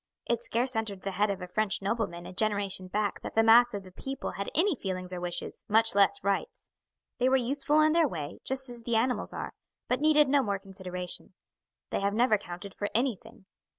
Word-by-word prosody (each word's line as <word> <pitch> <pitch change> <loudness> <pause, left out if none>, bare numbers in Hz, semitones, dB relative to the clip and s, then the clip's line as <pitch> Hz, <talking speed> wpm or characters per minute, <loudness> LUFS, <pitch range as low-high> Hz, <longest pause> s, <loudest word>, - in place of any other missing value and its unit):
It 235 -1 0
scarce 245 +2 0
entered 215 -4 -2
the 195 - -2
head 205 +3 +1
of 195 -2 -3
a - - -6
French 215 +2 +1
nobleman 195 -4 -2
a - - -9
generation 200 -2 -1
back 205 +1 -2
that - - -7
the 225 - +5
mass 235 0 +6
of 200 - -5
the 185 - -13
people 270 +8 -5
had 200 - -4
any 360 +2 +3
feelings 185 -5 -5
or 180 - -5
wishes, 175 -1 -4
much 225 +2 +5
less 200 -2 +3
rights. 200 0 -2 0.5
They 250 +1 +3
were 265 - +4
useful 280 +4 +1
in 310 0 +4
their 330 -1 +4
way, 155 - -6
just 265 0 +2
as 240 -1 -2
the 230 0 -1
animals 245 +3 0
are, - - -6 0.3
but 250 +2 0
needed 300 -1 +5
no 280 +1 +4
more 200 -5 -1
consideration. 185 -2 -7 0.6
They - - 0
have 200 +1 0
never 230 -2 +3
counted 180 +2 -8
for 205 - -3
anything. 230 -3 -2
215 Hz, 210 wpm, -29 LUFS, 195-250 Hz, 0.6 s, mass